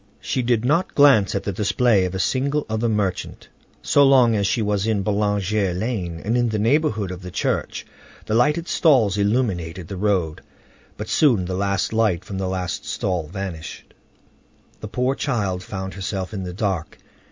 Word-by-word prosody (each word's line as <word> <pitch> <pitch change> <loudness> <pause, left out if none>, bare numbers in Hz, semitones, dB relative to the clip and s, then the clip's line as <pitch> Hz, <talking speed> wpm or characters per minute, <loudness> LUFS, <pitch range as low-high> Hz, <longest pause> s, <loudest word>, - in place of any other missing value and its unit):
She 130 - -2
did 120 -1 +1
not 165 +8 +1
glance 135 -10 +5
at 100 - -1
the 100 - -2
display 105 0 +2
of 90 +1 -4
a - - -2
single 140 - 0
other 110 +2 -1
merchant. 100 -4 -2 0.3
So 145 - +4
long 130 -4 +5
as 100 -1 +1
she 115 - 0
was 105 0 0
in 105 -3 0
Boulanger 105 -2 0
Lane 90 -5 -3
and 110 +3 0
in 120 -1 +2
the 110 - -1
neighborhood 110 - +1
of 90 0 -7
the 90 - -7
church, - - -2 0.4
the - - -3
lighted 150 +8 +2
stalls 115 - +3
illuminated 95 -6 -1
the 100 - -5
road; 90 -6 0 0.6
but - - -6
soon 120 - +3
the 90 - -4
last 100 +1 -1
light 105 -5 +1
from 95 -2 -5
the 95 -1 -2
last 90 -2 -3
stall 90 -5 -2
vanished. 90 -2 -7 0.9
The 110 - -7
poor 125 +5 0
child 100 -10 -2
found 95 0 -6
herself 95 0 -4
in 95 -3 -4
the 90 - -6
dark. 95 -5 -3
105 Hz, 175 wpm, -22 LUFS, 95-120 Hz, 0.9 s, glance